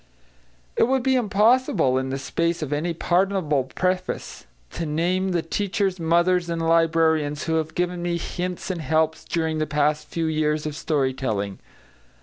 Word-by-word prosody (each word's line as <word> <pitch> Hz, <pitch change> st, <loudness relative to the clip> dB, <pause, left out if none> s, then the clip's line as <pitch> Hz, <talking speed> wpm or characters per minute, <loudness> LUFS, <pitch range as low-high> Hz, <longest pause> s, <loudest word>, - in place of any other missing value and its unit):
It -, -, +3 dB
would 265 Hz, -1 st, +1 dB
be 265 Hz, 0 st, +2 dB
impossible, 215 Hz, -, +3 dB
in 130 Hz, 0 st, -3 dB
the 135 Hz, -, -2 dB
space 170 Hz, +4 st, -1 dB
of 150 Hz, -1 st, -3 dB
any 160 Hz, +4 st, -1 dB
pardonable 175 Hz, -5 st, +1 dB
preface, 185 Hz, +6 st, -3 dB, 0.2 s
to 165 Hz, -, -4 dB
name 180 Hz, +5 st, 0 dB
the 175 Hz, -3 st, 0 dB
teachers, 195 Hz, +1 st, -1 dB
mothers, 170 Hz, +2 st, +2 dB
and 170 Hz, 0 st, -2 dB
librarians 165 Hz, -2 st, +2 dB
who 165 Hz, -, -1 dB
have 160 Hz, 0 st, -3 dB
given 180 Hz, 0 st, -1 dB
me 175 Hz, 0 st, -1 dB
hints 180 Hz, +2 st, -4 dB
and 175 Hz, -3 st, -4 dB
helps 160 Hz, 0 st, +1 dB
during 160 Hz, -2 st, -1 dB
the 155 Hz, -, 0 dB
past 150 Hz, +1 st, 0 dB
few 165 Hz, -1 st, -2 dB
years 155 Hz, -1 st, 0 dB
of 150 Hz, -1 st, -3 dB
story 140 Hz, -4 st, 0 dB
telling. 100 Hz, -7 st, -3 dB
165 Hz, 160 wpm, -24 LUFS, 150-180 Hz, 0.2 s, It